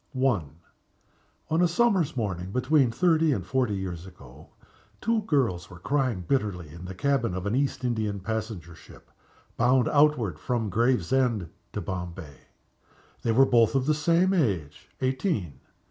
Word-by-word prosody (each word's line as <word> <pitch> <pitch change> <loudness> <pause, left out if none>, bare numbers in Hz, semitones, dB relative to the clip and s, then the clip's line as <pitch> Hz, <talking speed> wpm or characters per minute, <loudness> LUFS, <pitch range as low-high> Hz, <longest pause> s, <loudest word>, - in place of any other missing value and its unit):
I. 130 -7 +2 1.1
ON 160 +2 +3
a 175 - +5
summer's 185 - +1
morning, 95 -5 -3
between 130 +2 +3
thirty 160 +4 +2
and 95 -7 -3
forty 125 -4 0
years 95 -2 -5
ago, 75 -5 -15 0.5
two 230 0 +1
girls 120 - 0
were 90 - -11
crying 125 -3 -1
bitterly 100 - -1
in 85 +4 -10
the 95 +1 -7
cabin 130 -4 0
of 95 0 -4
an 100 - -1
East 135 -1 -1
Indian 110 -4 -1
passenger 105 -4 -4
ship, - - -17 0.5
bound 125 +1 +3
outward, 145 - +2
from 115 -2 -2
Gravesend 120 -3 +1 0.2
to 105 - -3
Bombay. 90 -5 -6 0.8
They 115 - 0
were 130 +4 +6
both 120 -1 +3
of 130 -1 +2
the 155 - +3
same 170 +5 +2
age 95 - -1
eighteen. 130 - -1
115 Hz, 145 wpm, -27 LUFS, 90-140 Hz, 1.1 s, were